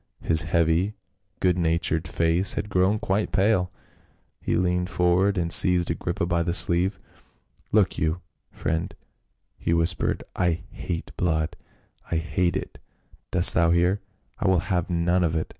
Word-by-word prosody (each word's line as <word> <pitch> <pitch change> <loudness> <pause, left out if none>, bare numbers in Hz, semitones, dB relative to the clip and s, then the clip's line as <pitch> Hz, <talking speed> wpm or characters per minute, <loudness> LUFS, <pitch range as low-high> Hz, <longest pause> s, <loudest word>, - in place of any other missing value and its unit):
His 80 -1 +4
heavy 85 +6 +1 0.5
good 90 -1 +2
natured 80 0 0
face 85 +3 0
had 105 - -4
grown 95 +3 +2
quite 105 0 -1
pale; 95 -2 +1 0.7
he - - -1
leaned 90 0 0
forward 90 +3 +2
and 85 -1 +1
seized 90 -2 +5
Agrippa 85 +1 -2
by 85 -1 0
the 85 +1 0
sleeve, 90 +2 +2 0.4
" - - -38
Look - - +2
you, 80 +2 -1 0.3
friend," 80 +1 -3 0.6
he 85 - 0
whispered, 85 +1 0
" - - -45
I 85 -2 0
hate 85 -2 -5
blood 80 -3 -1 0.3
— - - -27
I - - +1
hate 80 +2 0
it, - - -8 0.5
dost - - +5
thou 85 0 +3
hear? 90 +4 +2 0.4
I - - 0
will 95 -3 +3
have 90 -1 -1
none 90 +1 +1
of 80 -1 0
it. 80 - -1
85 Hz, 160 wpm, -24 LUFS, 85-90 Hz, 0.7 s, seized